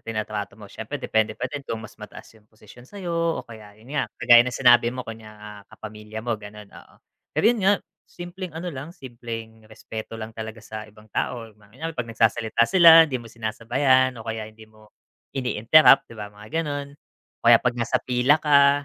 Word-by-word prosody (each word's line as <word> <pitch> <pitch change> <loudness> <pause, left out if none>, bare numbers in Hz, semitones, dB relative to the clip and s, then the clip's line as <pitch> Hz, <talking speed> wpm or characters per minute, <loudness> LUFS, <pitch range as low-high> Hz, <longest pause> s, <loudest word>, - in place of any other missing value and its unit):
trinatrato 105 -2 -5
mo, 105 - -13
siyempre 110 +7 -7
depende 110 -5 -1
pa - - -4
din 145 +3 -5
kung 135 -4 -5
mas 110 - -11
mataas 105 -1 -12
yung 105 - -33
posisyon 110 +3 -17
sa'yo, 190 -4 -6 0.3
o - - -15
kaya 110 -3 -14
yun 115 +6 -14
nga, 150 - -1
kagaya 120 0 +7
ng 125 -1 -4
sinabi 120 -1 +6
mo 125 +1 -6
konya 115 -2 -10
nga 105 0 -11 0.3
kapamilya 110 0 -9
mo 120 - -1
ganun, 105 0 -11
oo. - - -16 0.4
Pero - - +1
yun 235 - -4
nga, 195 - +5 0.4
simpleng 175 0 -8
ano 175 +1 -5
lang 140 +2 -7
simpleng 115 - -9
respeto 110 0 -8
lang 110 0 -8
talaga 110 0 -8
sa 110 -1 -8
ibang 105 +1 -19
tao, 115 -2 -3
kunyari 110 +10 -9
'pag 125 -5 -5
nagsasalita 115 0 +1
sila, 165 +1 +8
hindi 130 -6 -4
mo 115 - -12
sinasabayan 120 +4 +1
o 110 - -10
kaya 110 -1 -5
hindi 110 0 -16
mo 110 0 -22 0.5
ini-interrupt, 130 +3 +5
'di 115 - -13
ba 105 -1 -8
mga 105 +11 -4
gano'n. 145 -1 -5 0.5
O - - -6
kaya - - +9
'pag 125 - +1
nasa 120 +2 0
pila 125 +4 +3
ka, 140 -1 +4
115 Hz, 195 wpm, -23 LUFS, 110-135 Hz, 0.5 s, kaya